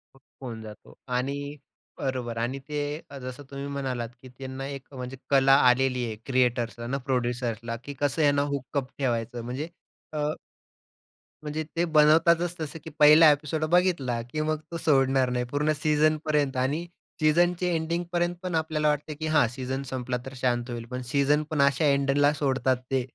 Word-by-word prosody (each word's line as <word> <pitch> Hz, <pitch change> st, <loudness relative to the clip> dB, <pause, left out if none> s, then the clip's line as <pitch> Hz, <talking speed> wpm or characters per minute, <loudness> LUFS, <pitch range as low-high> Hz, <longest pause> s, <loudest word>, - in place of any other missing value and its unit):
होऊन 125 Hz, -3 st, -10 dB
जातो. 105 Hz, -1 st, -12 dB
आणि 140 Hz, +3 st, -2 dB, 0.4 s
बरोबर, 125 Hz, -4 st, -3 dB
आणि 125 Hz, +4 st, -2 dB
ते 150 Hz, -1 st, -1 dB, 0.3 s
अ, 140 Hz, -, -9 dB
जसं 130 Hz, +2 st, -7 dB
तुम्ही 140 Hz, +1 st, -5 dB
म्हणालात 130 Hz, -4 st, -3 dB
की 130 Hz, -, -12 dB
त्यांना 135 Hz, 0 st, -6 dB
एक 140 Hz, 0 st, -8 dB
म्हणजे 125 Hz, 0 st, -6 dB
कला 135 Hz, -1 st, +5 dB, 0.2 s
आलेली 125 Hz, 0 st, +2 dB
आहे. 110 Hz, -2 st, -4 dB
क्रिएटर्सला 120 Hz, -2 st, 0 dB
ना, 135 Hz, -, -1 dB
प्रोड्युसर्सला, 120 Hz, -2 st, -1 dB
की 145 Hz, -, -6 dB
कसं 145 Hz, +2 st, +1 dB
यांना 145 Hz, -1 st, +4 dB
हुकअप 135 Hz, 0 st, -3 dB
ठेवायचं. 120 Hz, -3 st, -1 dB
म्हणजे 135 Hz, +7 st, -4 dB, 0.4 s
अ, 155 Hz, -, -2 dB, 1.2 s
म्हणजे 150 Hz, +1 st, -3 dB
ते 170 Hz, -, +2 dB
बनवताच 165 Hz, +3 st, +5 dB
तसं 155 Hz, 0 st, -5 dB
की -, -, -7 dB
पहिला 150 Hz, +1 st, +9 dB
एपिसोड 150 Hz, +2 st, -1 dB
बघितला, 155 Hz, -10 st, +2 dB
की 120 Hz, +6 st, -4 dB
मग 155 Hz, 0 st, 0 dB
तो 170 Hz, -, -3 dB
सोडणार 135 Hz, -4 st, +3 dB
नाही, 125 Hz, 0 st, -1 dB
पूर्ण 150 Hz, +2 st, +1 dB
सीजनपर्यंत. 150 Hz, -2 st, +2 dB
आणि 140 Hz, +7 st, 0 dB, 0.4 s
सीजनच्या 175 Hz, +3 st, +3 dB
एंडिंगपर्यंत 170 Hz, +1 st, -1 dB
पण 180 Hz, -2 st, -2 dB
आपल्याला 155 Hz, -1 st, 0 dB
वाटतं 150 Hz, +1 st, 0 dB
की 155 Hz, -, -2 dB
हा 145 Hz, -5 st, +5 dB
सीजन 130 Hz, +2 st, -4 dB
संपला 125 Hz, -1 st, -2 dB
तर 135 Hz, -, -7 dB
शांत 125 Hz, -1 st, -1 dB
होईल. 120 Hz, -1 st, -5 dB
पण 125 Hz, 0 st, -3 dB
सीजन 145 Hz, +1 st, +3 dB
पण 155 Hz, -3 st, +1 dB
अशा 140 Hz, +3 st, +3 dB
एंडला 140 Hz, +1 st, +3 dB
सोडतात, 135 Hz, -3 st, +1 dB
ते 130 Hz, -1 st, +2 dB
140 Hz, 160 wpm, -27 LUFS, 125-155 Hz, 1.2 s, पहिला